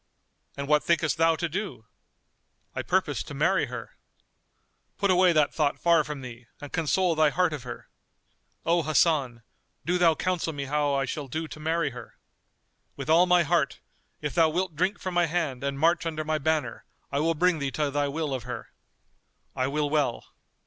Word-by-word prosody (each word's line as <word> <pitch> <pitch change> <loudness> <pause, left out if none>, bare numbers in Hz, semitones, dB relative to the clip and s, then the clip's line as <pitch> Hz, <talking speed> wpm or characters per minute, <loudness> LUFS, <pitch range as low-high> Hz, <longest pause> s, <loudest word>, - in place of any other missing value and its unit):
"And 140 0 -4
what 150 0 +3
thinkest 170 -2 +1
thou 165 0 +4
to 170 +2 -2
do?" 180 - -5 0.9
"I - - -2
purpose - - 0
to - - -8
marry - - +2
her." - - -8 1.0
"Put 200 -1 +2
away 180 0 +5
that 155 -3 +2
thought 150 -3 +1
far 170 -2 +4
from 145 -1 -6
thee, 120 -1 -10
and 145 - -9
console 170 +3 +1
thy 155 -1 +4
heart 180 +1 +1
of 145 - -5
her." 125 -1 -8 0.8
"O 170 +1 +3
Hasan, 145 -6 +1 0.4
do 180 +1 +1
thou 165 -2 +5
counsel 180 -2 -1
me 140 -1 -4
how 145 0 0
I 135 0 +1
shall 140 +2 -5
do 160 +5 -4
to 155 - -10
marry 160 -1 0
her." 120 -1 -11 0.8
"With 155 - -3
all 175 +3 +6
my 180 -1 +5
heart: 155 - 0 0.4
if 150 -3 -3
thou 160 +2 +4
wilt 180 +1 -2
drink 185 +6 0
from 185 - -4
my 175 -1 +3
hand 155 -6 -2
and 140 0 -2
march 165 +3 +2
under 155 -1 -3
my 155 0 -1
banner, 155 +1 -1 0.3
I 140 - 0
will 165 +2 +1
bring 175 0 +2
thee 140 -1 -1
to 150 -2 -1
thy 145 0 0
will 150 0 -2
of 130 - -2
her." 120 0 -7 0.9
"I 130 -1 0
will 145 +1 0
well." 145 -5 0
155 Hz, 190 wpm, -27 LUFS, 140-170 Hz, 1.0 s, all